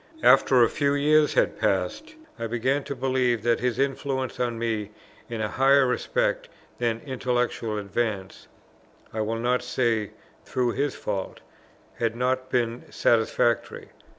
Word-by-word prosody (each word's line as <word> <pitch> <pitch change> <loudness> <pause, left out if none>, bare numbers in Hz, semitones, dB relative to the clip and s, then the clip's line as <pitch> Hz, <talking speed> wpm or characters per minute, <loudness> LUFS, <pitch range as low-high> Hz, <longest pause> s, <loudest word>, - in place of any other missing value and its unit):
After 125 -3 +6
a - - +5
few 140 +2 0
years 150 +1 +3
had - - +1
passed, 95 - -1 0.2
I 115 - -2
began 130 +5 0
to 140 - -4
believe 125 -3 0
that 120 -1 +2
his 125 -2 -1
influence 135 -1 -2
on 120 -2 -1
me 110 -3 -2 0.4
in 115 -2 -4
a 105 - 0
higher 135 +4 +4
respect 125 - -1 0.3
than 115 -2 -1
intellectual 125 -4 -1
advance, 100 -1 -3 0.7
(I 110 - -2
will 110 +1 -1
not 125 +2 +1
say 120 -4 -1 0.3
through 125 -2 0
his 140 +3 -1
fault,) 100 -3 -4 0.6
had 115 -1 0
not 130 +1 -1
been 120 -2 -1
satisfactory. 115 0 +1
120 Hz, 140 wpm, -25 LUFS, 115-130 Hz, 0.7 s, After